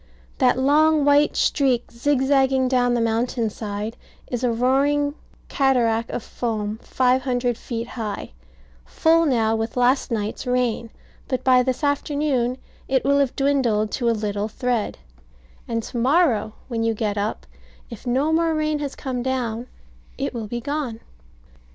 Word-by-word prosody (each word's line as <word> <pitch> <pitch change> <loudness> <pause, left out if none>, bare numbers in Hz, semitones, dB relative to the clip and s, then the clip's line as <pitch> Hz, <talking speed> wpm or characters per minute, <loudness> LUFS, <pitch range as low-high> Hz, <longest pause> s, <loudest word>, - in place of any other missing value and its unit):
That 255 -2 +4
long 300 +3 +4
white 290 +1 +4
streak, 260 -4 +1
zigzagging 265 +1 +2
down 245 -1 +2
the - - +1
mountain 230 0 0
side, 210 +1 -5 0.3
is 245 0 -4
a 245 - +2
roaring 280 +4 +2 0.3
cataract 235 -4 +1
of 230 - -4
foam 215 -2 -3
five 255 0 +2
hundred 245 -2 0
feet 230 +1 -5
high, 215 -4 -5 0.5
full 330 - +3
now 225 -4 +2
with 225 +2 -3
last 250 +3 +2
night's 220 +2 -3
rain; 245 -2 0 0.4
but 255 - -2
by 255 -1 +5
this 255 +2 -2
afternoon 285 -3 0 0.3
it 265 -1 +1
will 280 +1 +3
have 275 -3 +1
dwindled 250 -7 +1
to 240 -2 0
a 230 - +1
little 205 -1 -2
thread; 240 -1 -2 0.7
and 230 -1 -2
to 240 - -6
morrow, 250 -4 +2
when 230 -3 -2
you 225 0 +1
get 210 -1 -1
up, 205 +1 -3 0.5
if 230 +2 -9
no 270 +6 +1
more 325 0 +2
rain 305 -1 0
has 285 -2 -4
come 255 -2 -4
down, 245 -2 -2 0.5
it - - -2
will 225 -3 -4
be 240 +3 -4
gone. 280 -4 -3
250 Hz, 150 wpm, -23 LUFS, 230-275 Hz, 0.7 s, by